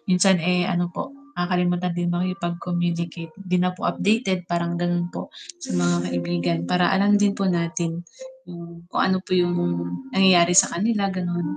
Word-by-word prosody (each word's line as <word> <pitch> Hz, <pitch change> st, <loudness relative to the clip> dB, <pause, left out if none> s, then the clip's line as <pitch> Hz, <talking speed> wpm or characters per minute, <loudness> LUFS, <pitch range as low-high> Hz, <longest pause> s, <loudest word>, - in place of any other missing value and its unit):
minsan 185 Hz, +1 st, +4 dB
eh, 180 Hz, 0 st, +1 dB
ano 175 Hz, -1 st, 0 dB
po, -, -, -4 dB, 0.3 s
nakakalimutan 180 Hz, 0 st, 0 dB
din 175 Hz, 0 st, -1 dB
makipag-communicate, 175 Hz, -2 st, -3 dB
'di 180 Hz, -2 st, -1 dB
na 180 Hz, 0 st, +1 dB
po -, -, -12 dB
updated 195 Hz, -4 st, 0 dB
parang 170 Hz, 0 st, -1 dB
ganon 175 Hz, 0 st, 0 dB
po, -, -, -7 dB, 0.3 s
sa -, -, -5 dB
mga 85 Hz, 0 st, +2 dB
kaibigan 85 Hz, -1 st, -1 dB
para 180 Hz, +1 st, +3 dB
alam 205 Hz, +2 st, +4 dB
din 205 Hz, -1 st, +3 dB
po 195 Hz, -1 st, -1 dB
natin, 170 Hz, -1 st, -2 dB, 0.4 s
hmm, 170 Hz, 0 st, -11 dB
kung -, -, +1 dB
ano 190 Hz, 0 st, +2 dB
po -, -, -6 dB
yung 175 Hz, -1 st, +2 dB, 0.6 s
nangyayari 180 Hz, -2 st, +5 dB
sa -, -, +6 dB
kanila 205 Hz, 0 st, +1 dB
ganon. 175 Hz, -, -3 dB
175 Hz, 160 wpm, -23 LUFS, 170-185 Hz, 0.6 s, sa